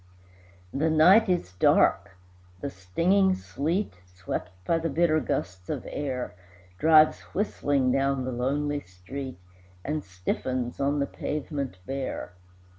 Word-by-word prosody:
The 155 +4 +1
night 185 +8 +6
is 175 - 0
dark, 95 +1 +3 0.4
the 140 - -4
stinging 180 - +2
sleet, 165 - -2
Swept 90 0 -5 0.2
by 165 - +2
the 165 0 -1
bitter 155 +1 +3
gusts 90 - -3
of - - -3
air, 130 -9 -3 0.5
Drives 155 -1 +6 0.2
whistling 145 -10 +1
down 135 0 +1
the 130 - -2
lonely 145 +4 -1
street, 130 +7 -8 0.5
And 150 +1 -2
stiffens 120 +7 -3
on 140 +1 +1
the 140 - +1
pavement 140 - -4
bare. 135 -6 -4
140 Hz, 120 wpm, -27 LUFS, 120-155 Hz, 0.5 s, night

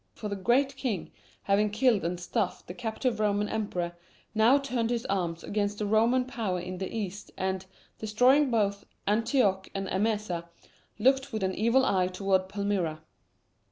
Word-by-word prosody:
For 210 - -5
the 200 - -2
"Great 260 +7 +2
King," 230 -11 -3 0.3
having 205 +1 +2
killed 220 0 +2
and 175 +1 -2
stuffed 180 - -2
the 180 - -7
captive 225 +2 -2
Roman 210 -1 +1
Emperor, 180 -6 -2 0.4
now 225 +5 +5
turned 250 -5 -1
his 235 -1 -1
arms 175 -4 -1
against 205 0 -1
the 210 - -2
Roman 230 +5 +3
power 220 -8 -2
in 180 +1 -6
the 190 - -4
east 205 -2 -5
and, 190 0 -1 0.4
destroying 250 +7 +4
both 200 -4 +1 0.2
Antioch 210 -2 +2
and 195 0 -2
Emesa, 205 -4 -1 0.5
looked 265 +4 +3
with 215 -3 -2
an 190 0 0
evil 235 +6 +3
eye 185 -5 +2
toward 190 0 0
Palmyra. 190 -6 -1
210 Hz, 160 wpm, -29 LUFS, 190-235 Hz, 0.5 s, now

